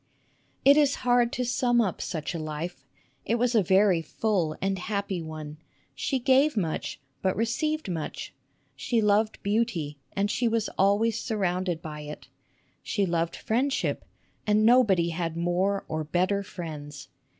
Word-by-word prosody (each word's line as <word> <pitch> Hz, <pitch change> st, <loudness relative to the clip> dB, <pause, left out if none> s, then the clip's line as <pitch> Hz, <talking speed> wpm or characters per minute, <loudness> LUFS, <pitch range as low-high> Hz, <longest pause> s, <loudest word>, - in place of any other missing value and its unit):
It 280 Hz, +2 st, +8 dB
is 290 Hz, -2 st, +4 dB
hard 245 Hz, -1 st, +4 dB
to 250 Hz, -, -1 dB
sum 245 Hz, 0 st, +2 dB
up 205 Hz, -6 st, 0 dB
such 160 Hz, -1 st, -3 dB
a 170 Hz, -, -3 dB
life. 155 Hz, -1 st, -5 dB, 0.4 s
It 230 Hz, -, 0 dB
was 245 Hz, +1 st, +1 dB
a 220 Hz, -, +5 dB
very 190 Hz, -1 st, +4 dB
full 170 Hz, -1 st, -1 dB
and 195 Hz, 0 st, -1 dB
happy 200 Hz, -2 st, -2 dB
one. 155 Hz, -1 st, -7 dB, 0.4 s
She 275 Hz, -, -1 dB
gave 265 Hz, +2 st, +3 dB
much, 165 Hz, -6 st, -2 dB, 0.2 s
but 190 Hz, -1 st, +1 dB
received 305 Hz, +8 st, -1 dB
much. 165 Hz, -4 st, -5 dB, 0.4 s
She 235 Hz, -, 0 dB
loved 215 Hz, +1 st, +2 dB
beauty, 200 Hz, -9 st, -1 dB, 0.2 s
and 200 Hz, +1 st, +1 dB
she 240 Hz, -, +1 dB
was 225 Hz, -1 st, 0 dB
always 205 Hz, +3 st, +2 dB
sur 220 Hz, -3 st, -3 dB
rounded 180 Hz, -3 st, -1 dB
by 150 Hz, -1 st, -6 dB
it. 150 Hz, 0 st, -9 dB, 0.5 s
She 200 Hz, -3 st, 0 dB
loved 170 Hz, -1 st, -1 dB
friendship, 260 Hz, +5 st, -1 dB, 0.4 s
and 210 Hz, +1 st, +4 dB
nobody 215 Hz, -8 st, +5 dB
had 165 Hz, -1 st, -3 dB
more 180 Hz, +4 st, 0 dB
or 155 Hz, 0 st, -2 dB
better 185 Hz, +6 st, +1 dB
friends. 150 Hz, -6 st, -8 dB
195 Hz, 150 wpm, -27 LUFS, 165-230 Hz, 0.5 s, It